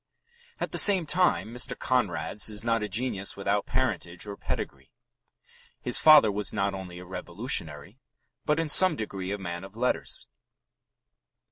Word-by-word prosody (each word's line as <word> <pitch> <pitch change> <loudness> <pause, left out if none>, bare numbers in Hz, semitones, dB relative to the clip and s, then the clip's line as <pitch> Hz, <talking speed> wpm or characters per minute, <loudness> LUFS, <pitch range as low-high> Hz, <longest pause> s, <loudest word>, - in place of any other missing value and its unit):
At - - -4
the - - +1
same 195 -5 +7
time, 160 -8 +1
Mr. 125 - -2
Conrad's 105 -4 0
is 105 0 -4
not 115 -1 0
a 105 - -4
genius 100 -2 -2
without 100 +1 -1
parentage 110 -9 -2
or 100 -1 -7
pedigree. - - -6 0.9
His - - -1
father 150 -9 +7
was 105 +1 -1
not 100 0 -1
only 95 -2 -8
a 90 - -10
revolutionary, 90 - -3 0.4
but 150 +1 0
in 165 - -1
some 185 +2 +6
degree 95 -5 -5
a 100 - -3
man 85 -2 -6
of 95 +2 -12
letters. 125 +1 -1
105 Hz, 150 wpm, -27 LUFS, 95-130 Hz, 0.9 s, same